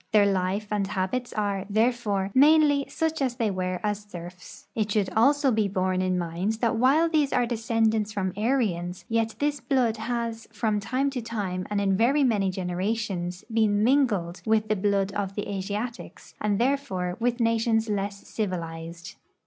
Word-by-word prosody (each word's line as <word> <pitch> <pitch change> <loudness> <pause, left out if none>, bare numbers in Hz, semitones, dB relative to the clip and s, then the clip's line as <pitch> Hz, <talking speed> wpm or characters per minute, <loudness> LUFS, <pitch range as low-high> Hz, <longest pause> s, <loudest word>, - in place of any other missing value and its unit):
Their 210 -1 +6
life 195 +1 0
and 205 -2 0
habits 200 +6 -2
are, 200 -2 -2
therefore, 215 -3 +1
mainly 290 0 +5
such 320 -1 -1
as 255 -3 0
they 230 -4 0
were 185 -1 -2
as 205 -1 0
serfs. 180 -3 -11
It 215 -2 -1
should 200 -2 +1
also 275 +4 +4
be 215 -2 +2
borne 185 -1 0
in 185 -1 0
mind 175 +4 -1
that 230 +1 0
while 275 +8 +4
these 305 -4 +1
are 245 - +2
descendants 225 -2 0
from 190 -3 -2
Aryans, 205 -7 -1
yet 225 -1 0
this 290 0 0
blood 245 -5 +1
has 230 0 -3
from 215 -1 0
time 260 +7 -1
to 255 -3 -3
time 200 -5 -3
and 205 -1 0
in 195 -1 +2
very 260 +8 +3
mau}'^ 205 -7 +2
generations 185 0 -3
])oen 210 -2 +3
mingled 220 -10 +2
with 220 -1 +1
the 215 - +3
blood 200 0 +1
of 195 -1 -3
the 205 - -3
Asiatics, 205 +4 -5
and 210 -1 +1
therefore 195 -9 0
with 240 +1 0
nations 230 -1 +2
less 200 -1 -3
civilized. 170 -4 -5
210 Hz, 165 wpm, -26 LUFS, 190-235 Hz, -, Their